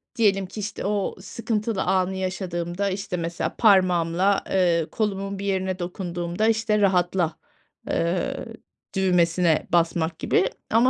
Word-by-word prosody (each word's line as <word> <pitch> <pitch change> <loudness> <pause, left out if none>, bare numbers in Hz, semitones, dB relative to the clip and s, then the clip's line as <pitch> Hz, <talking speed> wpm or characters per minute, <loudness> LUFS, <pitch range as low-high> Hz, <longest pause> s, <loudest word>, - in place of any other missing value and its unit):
diyelim 195 -5 +2
ki, 210 - -9
işte, 205 -1 -4
o 205 -1 -1
sıkıntılı 215 -1 -2
anı 190 0 +1
yaşadığımda, 185 0 -2
işte, 195 -1 -3
mesela 170 +1 -3
parmağımla, 185 -2 +3
eee, 175 -4 +2
kolumun 195 -2 -2
bir 200 - -4
yerine 190 -1 -1
dokunduğumda, 175 +2 -2
işte, 220 -1 +2
rahatla, 180 -3 +2 0.5
eee, 170 +2 0 0.6
düğmesine 175 -3 +2
basmak 165 -1 +1
gibi 185 - +2 0.2
ama, 230 +3 +5
185 Hz, 120 wpm, -24 LUFS, 175-200 Hz, 0.6 s, ama